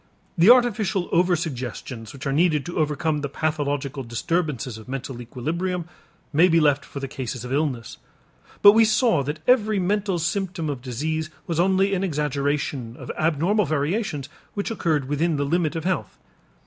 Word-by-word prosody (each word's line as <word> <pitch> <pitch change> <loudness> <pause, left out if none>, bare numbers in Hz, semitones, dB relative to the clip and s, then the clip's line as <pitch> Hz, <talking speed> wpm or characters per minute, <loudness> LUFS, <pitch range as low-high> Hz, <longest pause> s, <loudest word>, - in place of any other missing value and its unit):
The 175 +5 +5
artificial 215 -7 +4
over 175 +1 +3
suggestions 125 -7 -5
which 140 0 -9
are 135 - 0
needed 155 -1 +2
to 175 -1 -4
overcome 150 0 0
the 145 - -3
pathological 145 -2 -2
disturbances 130 -1 -2
of 110 - -13
mental 130 -2 -5
equilibrium 165 +9 -3 0.5
may 165 +5 +6
be 165 -2 +4
left 145 -2 +3
for 140 - -8
the 135 - -4
cases 125 -2 -5
of 125 - -4
illness. 135 -6 -2 0.7
But 205 - +11
we 225 +2 +5
saw 220 - +3
that 150 +3 -4
every 220 -4 +4
mental 195 0 0
symptom 175 -1 -2
of 135 -3 -6
disease 155 +6 -3 0.2
was 165 -1 -2
only 190 +2 +3
an 190 0 0
exaggeration 145 -6 -2
of - - -6
abnormal 170 +7 +2
variations 155 - -1 0.3
which 205 +2 -2
occurred 155 -10 0
within 155 +3 +1
the 145 0 0
limit 165 +1 0
of 165 - -3
health. 185 +1 -2
155 Hz, 165 wpm, -24 LUFS, 140-180 Hz, 0.7 s, But